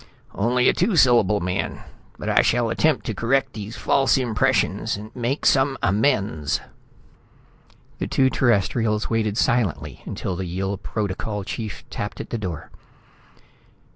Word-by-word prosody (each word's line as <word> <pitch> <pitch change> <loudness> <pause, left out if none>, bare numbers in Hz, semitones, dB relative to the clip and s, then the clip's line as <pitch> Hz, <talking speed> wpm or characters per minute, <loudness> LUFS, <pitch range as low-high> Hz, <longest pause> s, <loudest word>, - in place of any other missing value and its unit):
"Only 125 +4 +2
a - - +5
two 215 - +1
syllable 115 - +4
man, 90 +2 -3 0.3
but - - -7
I - - +4
shall 120 -1 +1
attempt 155 +1 +1
to 110 - -2
correct 125 +7 0
these 110 +2 -7
false 135 0 +3
impressions, 115 -5 +1 0.2
make 125 +3 -2
some 135 0 +3
amends...." 95 - +1 1.4
The - - -2
two 130 -1 +2
Terrestrials 110 -2 +1
waited 110 -2 0
silently 80 - 0
until 95 - -4
the 95 - -4
Yill 95 +3 -3
Protocol 105 +1 -3
chief 110 +2 -6
tapped 105 - -5
at - - -7
the 115 - -2
door. 90 -7 -5
110 Hz, 135 wpm, -23 LUFS, 95-125 Hz, 1.4 s, a